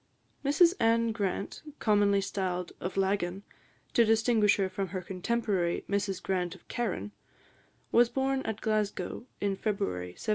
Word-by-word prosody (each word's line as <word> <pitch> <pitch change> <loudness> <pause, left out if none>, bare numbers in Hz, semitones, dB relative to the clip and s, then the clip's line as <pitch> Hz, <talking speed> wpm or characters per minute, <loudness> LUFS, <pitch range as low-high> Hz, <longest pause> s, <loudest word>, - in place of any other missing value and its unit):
Mrs 325 +5 +5
Anne 230 0 +3
Grant, 200 -3 -3 0.2
commonly 205 -2 +3
styled 180 -3 -2
of 185 +2 -4
Laggan, 195 -1 0 0.5
to 235 - +6
distinguish 220 -1 +4
her 195 -2 +1
from 190 +1 -3
her 185 +1 -4
contemporary, 190 -2 -1
Mrs 200 -2 -1
Grant 180 -2 -1
of 185 - -19
Carron, 225 -3 -2 0.8
was 240 0 +5
born 270 +1 0
at 220 -4 -4
Glasgow, 215 +2 -1
in 200 -1 0
February 90 - -2
1755. - - -6
200 Hz, 140 wpm, -30 LUFS, 185-225 Hz, 0.8 s, to